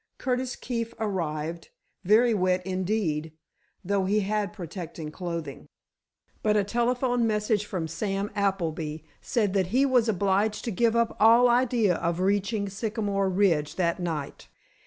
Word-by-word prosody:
Curtis 255 -1 -2
Keefe 230 -2 -4
arrived, 165 -5 -3 0.3
very 225 +5 +4
wet 185 -2 +1
indeed, 185 -5 -1 0.5
though 195 0 +1
he 210 +3 +2
had 205 0 -1
protecting 170 -5 -7
clothing. 170 -1 -6 0.7
But 210 0 +2
a 205 - +3
telephone 240 +2 +1
message 210 -1 0
from 175 -5 -3
Sam 195 +4 -3
Appleby 165 -6 -2 0.2
said 210 -6 0
that 190 -3 +1
he 255 +8 +3
was 250 -4 +3
obliged 200 +1 +1
to 235 - -1
give 230 +3 +2
up 235 -1 +1
all 230 +3 +7
idea 240 -6 +2
of 170 +1 -1
reaching 200 +2 0
Sycamore 200 -1 -1
Ridge 180 -6 +1
that 170 -2 0
night. 160 -5 -4
200 Hz, 135 wpm, -27 LUFS, 175-225 Hz, 0.7 s, all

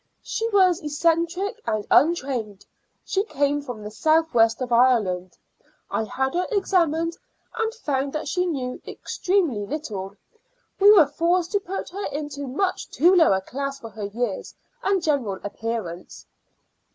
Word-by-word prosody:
She 455 +1 -2
was 375 -4 +4
eccentric 335 +7 0
and 215 -1 -1
untrained. 255 - +2 0.4
She 390 - 0
came 290 -7 0
from 245 -6 -7
the 210 - -7
south 320 +7 +2
west 225 -1 +4
of 255 -2 -4
Ireland. 220 -7 +2 0.5
I 220 - 0
had 265 +5 -2
her 360 +1 0
examined, 335 -6 +1 0.4
and 450 -1 0
found 280 - -2
that 305 - -3
she 360 0 0
knew 255 -6 -3
extremely 345 - -1
little. 200 -7 -5 0.6
We 400 +1 +7
were 385 -7 +8
forced 335 +4 0
to 405 - +2
put 390 -1 -5
her 400 +3 -5
into 290 -1 -5
much 365 +9 -2
too 350 +5 +4
low 335 - +6
a 190 0 +2
class 275 +6 -5
for 225 -4 -9
her 210 0 -6
years 210 0 -4 0.3
and 390 -5 +1
general 255 - 0
appearance." 205 -4 -5
290 Hz, 150 wpm, -24 LUFS, 230-355 Hz, 0.6 s, were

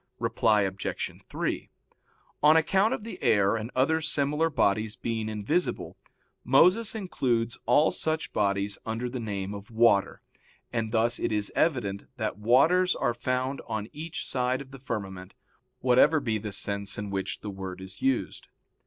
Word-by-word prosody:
Reply 105 -2 +2
Obj. 95 0 -3 0.2
3: - - -3 0.7
On 155 +2 +6
account 195 +7 +3
of 260 - -3
the 225 - -8
air 105 -5 +3
and 110 0 -4
other 160 +5 +2
similar 150 +1 +1
bodies 110 -5 +1
being 110 -2 -3
invisible, 110 - -1 0.5
Moses 185 - +4
includes 120 - -1
all 145 +6 +5
such 155 0 -2
bodies 100 0 0
under 115 +2 -3
the 130 - -4
name 100 -3 -4
of 100 +2 -9
water, 115 -4 +2 0.5
and 115 -1 -1
thus 115 +1 +1
it - - -1
is 105 -1 +1
evident 115 -11 0
that 110 -3 -3
waters 160 +12 +4
are 120 - 0
found 130 +3 -2
on 110 0 -3
each 160 +2 -5
side 125 0 0
of 140 -1 -10
the 135 - -10
firmament, 95 -6 -6 0.5
whatever 130 +5 +5
be 110 -5 -1
the 105 0 -5
sense 100 0 -1
in 105 -1 -5
which 95 -1 -3
the 105 - -5
word 95 -1 -7
is 95 0 -10
used. 135 -1 -1
115 Hz, 155 wpm, -27 LUFS, 105-140 Hz, 0.7 s, On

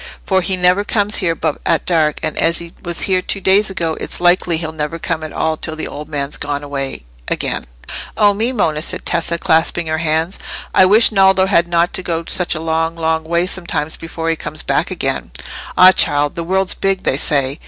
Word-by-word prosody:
For 190 -1 +2
he 185 +1 0
never 180 +2 +3
comes 205 0 +1
here 170 -4 0
but 150 - -2
at - - 0
dark; 155 -4 +1
and 155 -1 -2
as 165 +1 +2
he 170 0 -8
was 170 -1 -1
here 185 -1 +1
two 195 - -2
days 195 +3 +3
ago, 165 -4 -2
it's - - -2
likely 175 -1 +2
he'll 160 -1 -4
never 155 +1 -4
come 165 -1 -3
at 155 - -6
all 160 0 -1
till 160 - -4
the 160 - -5
old 150 +1 -8
man's 145 -1 -3
gone 145 0 -3
away 135 - -5 0.2
again." - - -2 0.5
"Oh 205 -2 +4
me! 225 +5 -1
Monna," 160 -11 0
said - - -2
Tessa, 170 0 0
clasping 165 +1 +1
her 160 0 -2
hands, 160 +3 -1 0.3
"I 185 - +6
wish 215 +5 +6
Naldo 190 -2 +4
had 175 -3 +2
not 170 0 +1
to - - -1
go 170 -2 -3
such 180 -1 +1
a - - -3
long, 165 +1 -1
long 160 -1 -1
way 170 +2 0
sometimes 165 -5 -1
before 165 0 -6
he - - 0
comes - - -4
back - - 0
again." - - -3 0.5
"Ah, 185 +1 +9
child! 145 -5 +2
the 170 - -4
world's 190 +2 0
big, 195 -1 -1
they 135 - +1
say. 140 0 0
170 Hz, 215 wpm, -17 LUFS, 155-185 Hz, 0.5 s, Ah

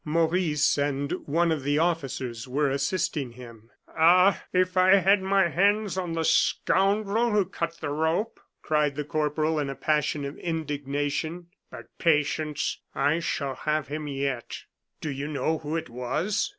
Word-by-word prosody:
Maurice 160 -2 +1
and 140 0 -1 0.2
one 165 +3 +2
of 155 -3 -1
the 145 +2 0
officers 135 -8 -2
were 140 +2 0
assisting 140 -2 -1
him. 115 -2 -13 0.2
"Ah! 180 +4 +4
if 185 0 +1
I 185 +1 +6
had 195 0 +4
my 195 -1 +3
hands 200 +2 +2
on 180 -3 -3
the 165 -1 -1
scoundrel 205 +7 +2
who 210 -3 +2
cut 170 -2 -4
the - - -3
rope," 160 +9 -1 0.2
cried 150 -2 +1
the 150 - -2
corporal, 155 +1 0
in 145 -2 -2
a 135 - -4
passion 150 +1 0
of 140 - -7
indignation; 150 +1 -3 0.2
"but - - -10
patience. 150 -2 0 0.2
I 150 +3 +2
shall 140 -5 -2
have 150 +3 -2
him 150 +1 -4
yet." 135 -3 -3 0.4
"Do 150 - -3
you 140 +1 -4
know 155 +2 -1
who 155 +1 -4
it 165 - -4
was?" 130 - -2
155 Hz, 155 wpm, -26 LUFS, 140-175 Hz, 0.4 s, I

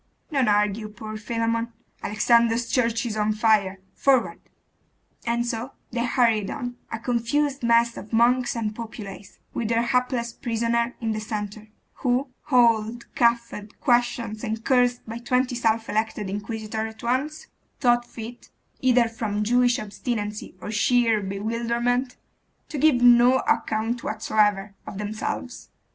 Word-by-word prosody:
Don't 270 -4 +2
argue, 210 +1 +1
poor 215 0 -8
Philammon; 230 +1 -2 0.3
Alexander's 235 +2 +2
church 230 -2 +1
is 225 -3 -3
on 215 0 +1
fire! 210 -3 +2 0.2
forward! 270 -3 +2 0.9
And 235 +1 +1
so 235 +2 -4 0.2
they 235 -1 -1
hurried 230 -5 +2
on, 245 -1 -4 0.2
a - - -2
confused 255 +5 0
mass 235 0 +3
of 210 - -9
monks 240 +2 +3
and 215 -2 -2
populace, 210 -4 -8 0.2
with 230 - -2
their 230 +1 +2
hapless 250 -1 0
prisoners 235 0 0
in 225 -1 -1
the 215 - -2
centre, 210 0 -5 0.3
who, 255 +1 0 0.2
hauled, 235 -3 +2
cuffed, 235 -3 0
questioned, 240 -3 +1
and 225 -1 -3
cursed 245 -1 +2
by 225 +1 -5
twenty 250 +1 +1
self 230 -2 +1
elected 215 -2 -2
inquisitors 220 +1 -4
at - - -16
once, 270 +6 -1 0.3
thought 240 -3 +3
fit, 235 +1 -9 0.3
either 250 -2 +4
from 220 -2 -2
Jewish 245 +2 +3
obstinacy 210 0 -4
or 210 - -6
sheer 225 0 +3
bewilderment, 235 +5 -1 0.5
to 300 - -4
give 310 -1 +5
no 245 +1 +7
account 235 -5 0
whatsoever 210 -2 +1
of - - -7
themselves. 215 +4 -4
230 Hz, 135 wpm, -24 LUFS, 215-245 Hz, 0.9 s, no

